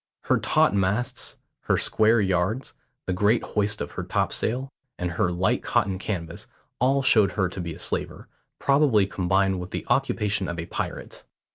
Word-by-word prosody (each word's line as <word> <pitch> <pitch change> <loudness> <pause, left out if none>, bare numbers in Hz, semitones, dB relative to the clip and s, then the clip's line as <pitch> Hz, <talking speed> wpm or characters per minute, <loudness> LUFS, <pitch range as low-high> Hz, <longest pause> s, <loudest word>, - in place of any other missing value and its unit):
Her - - +2
taut - - +3
masts, 100 +5 -1 0.3
her - - +2
square 110 +2 +3
yards, 95 +5 0 0.3
the 95 - -1
great 105 +5 +2
hoist 105 0 -1
of 70 - -4
her - - -5
topsails, 130 +4 -1 0.3
and 90 -1 -2
her 90 0 0
light 90 +2 +1
cotton 95 -2 0
canvas, 85 -5 -5 0.3
all 135 +2 +2
showed 105 -6 +4
her 95 -3 +1
to 95 - -6
be 85 -2 -5
a - - -11
slaver, - - -3 0.3
probably 140 -8 +3
combined 95 0 +1
with 90 +1 -6
the - - -5
occupation 105 -7 +1
of 85 - -4
a 85 - -4
pirate. - - -6
100 Hz, 165 wpm, -25 LUFS, 90-110 Hz, 0.3 s, showed